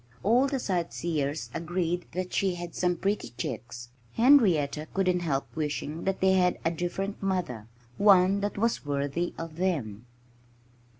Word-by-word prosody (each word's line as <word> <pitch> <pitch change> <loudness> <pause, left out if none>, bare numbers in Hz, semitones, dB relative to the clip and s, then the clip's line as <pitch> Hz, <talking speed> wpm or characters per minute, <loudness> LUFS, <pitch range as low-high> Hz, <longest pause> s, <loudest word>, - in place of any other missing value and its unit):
All 245 +7 +4
the 275 0 -1
sightseers 160 - -2
agreed 175 +1 -2
that 180 0 -4
she 190 -2 +1
had 175 -1 -7
some 180 -1 +1
pretty 200 - -2
chicks. 120 -1 -5 0.2
Henrietta 175 - +4
couldn't 185 -2 +2
help 140 -6 -2
wishing 155 +1 -3
that 195 0 -1
they 190 0 +4
had 180 -1 +3
a 165 - +3
different 175 +4 -3
mother 180 - -2 0.3
one 195 -1 +5
that 205 0 -3
was 230 +3 0
worthy 145 +4 -2
of 165 -1 -7
them. 125 - -2
175 Hz, 140 wpm, -28 LUFS, 150-195 Hz, 0.3 s, one